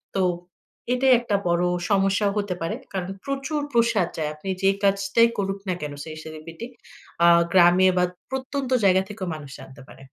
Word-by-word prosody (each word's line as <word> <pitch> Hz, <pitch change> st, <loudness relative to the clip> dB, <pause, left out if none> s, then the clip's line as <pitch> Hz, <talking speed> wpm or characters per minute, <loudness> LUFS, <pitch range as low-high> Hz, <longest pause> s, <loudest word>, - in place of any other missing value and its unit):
তো 190 Hz, -, +1 dB, 0.7 s
এটাই 260 Hz, +1 st, +4 dB
একটা 235 Hz, -4 st, -1 dB
বড় 170 Hz, +1 st, +2 dB, 0.3 s
সমস্যা 195 Hz, +1 st, +2 dB
হতে 200 Hz, -3 st, -2 dB
পারে। 165 Hz, +6 st, -2 dB, 0.2 s
কারণ 185 Hz, -1 st, -3 dB, 0.2 s
প্রচুর 275 Hz, +2 st, -2 dB
প্রসার 230 Hz, -6 st, +2 dB
যায়। 155 Hz, -1 st, -1 dB
আপনি 170 Hz, +6 st, -8 dB
যে, 195 Hz, -, +4 dB
কাজটাই 200 Hz, +3 st, +3 dB
করুক 195 Hz, 0 st, -2 dB
না 185 Hz, -, +1 dB
কেন 145 Hz, -1 st, -5 dB
সেই 155 Hz, -1 st, -8 dB
celebrity, 160 Hz, +7 st, -9 dB, 0.6 s
আ -, -, +7 dB, 0.2 s
গ্রামে 185 Hz, 0 st, +6 dB
বা 180 Hz, -, +3 dB, 0.3 s
প্রত্যন্ত 265 Hz, 0 st, -4 dB
জায়গা 190 Hz, -1 st, +5 dB
থেকেও 200 Hz, -3 st, -6 dB
মানুষ 145 Hz, -3 st, -10 dB
জানতে 135 Hz, +1 st, -13 dB
পারে। 130 Hz, +3 st, -14 dB
195 Hz, 165 wpm, -24 LUFS, 170-230 Hz, 0.7 s, আ